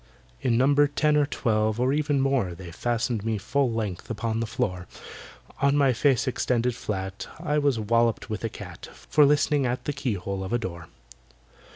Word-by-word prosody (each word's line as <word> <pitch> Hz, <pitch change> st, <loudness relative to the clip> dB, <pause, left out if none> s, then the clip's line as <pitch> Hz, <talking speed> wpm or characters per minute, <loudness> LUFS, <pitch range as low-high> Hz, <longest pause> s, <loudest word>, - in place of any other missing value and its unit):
In 120 Hz, -3 st, +2 dB
number 145 Hz, +3 st, +4 dB
ten 150 Hz, +1 st, +1 dB
or 145 Hz, -1 st, +3 dB
twelve, 110 Hz, -4 st, 0 dB
or 130 Hz, +2 st, +2 dB
even 145 Hz, -2 st, +1 dB
more, 130 Hz, -10 st, +1 dB
They 90 Hz, -1 st, -9 dB
fastened 120 Hz, +3 st, -1 dB
me 110 Hz, -1 st, -1 dB
full 130 Hz, +5 st, 0 dB
length 105 Hz, -6 st, -4 dB
upon 115 Hz, 0 st, -2 dB
the 115 Hz, -, -2 dB
floor. 105 Hz, -7 st, -2 dB, 0.7 s
On 140 Hz, +1 st, +3 dB
my 135 Hz, -3 st, +4 dB
face 135 Hz, 0 st, +2 dB
extended 125 Hz, -1 st, 0 dB
flat, 95 Hz, -4 st, -5 dB
I 150 Hz, 0 st, 0 dB
was 140 Hz, -4 st, +2 dB
walloped 115 Hz, +1 st, +1 dB
with 110 Hz, 0 st, -5 dB
a 115 Hz, -, -1 dB
cat -, -, -10 dB
For 150 Hz, -2 st, +3 dB
listening 145 Hz, -1 st, +2 dB
at 125 Hz, +1 st, -3 dB
the 145 Hz, -, -1 dB
keyhole 100 Hz, -8 st, -3 dB
of 95 Hz, -, -4 dB
a -, -, +4 dB
door. 85 Hz, -7 st, -6 dB
120 Hz, 180 wpm, -26 LUFS, 110-140 Hz, 0.7 s, number